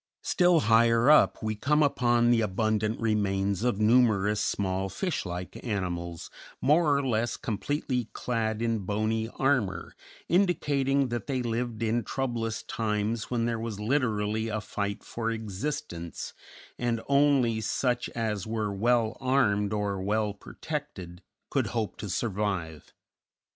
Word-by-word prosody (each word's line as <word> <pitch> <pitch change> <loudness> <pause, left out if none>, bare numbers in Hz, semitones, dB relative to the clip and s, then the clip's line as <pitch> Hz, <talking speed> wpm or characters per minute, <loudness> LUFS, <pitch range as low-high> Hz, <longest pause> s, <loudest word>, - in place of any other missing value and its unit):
Still 175 -2 +4
higher 115 +4 +5
up 150 - +5
we 110 0 0
come 150 +8 +2
upon 120 -4 +3
the 115 -1 +4
abundant 110 +1 0
remains 100 -2 0
of 120 -5 +1
numerous 105 -3 +3
small 95 -1 -1
fish 170 - -2
like 90 +1 -6
animals, 85 -6 -3 0.3
more 150 +1 +4
or 140 - -1
less 115 -1 0
completely 125 +1 -2
clad 115 -2 -2
in 115 -1 +1
bony 110 +3 -1
armor, 130 -8 0 0.3
indicating 140 -7 +2
that 120 -1 -4
they 130 -3 -1
lived 115 -1 -2
in 115 +1 +1
troublous 115 -2 -2
times 110 0 -2
when 120 -2 0
there 115 -1 -1
was 110 -3 -4
literally 110 -3 0
a 110 -1 -2
fight 100 -1 -4
for 115 -1 -3
existence 110 - -4 0.5
and 120 -1 0
only 140 -5 +3
such 120 +3 0
as 110 -4 -2
were 110 -2 -2
well 115 +2 +2
armed 105 -6 +2
or 100 -2 -1
well 105 +1 0
protected 100 - -7 0.3
could 130 -6 +1
hope 110 -2 -2
to 105 - -6
survive. 95 -6 -2
115 Hz, 130 wpm, -28 LUFS, 105-125 Hz, 0.5 s, higher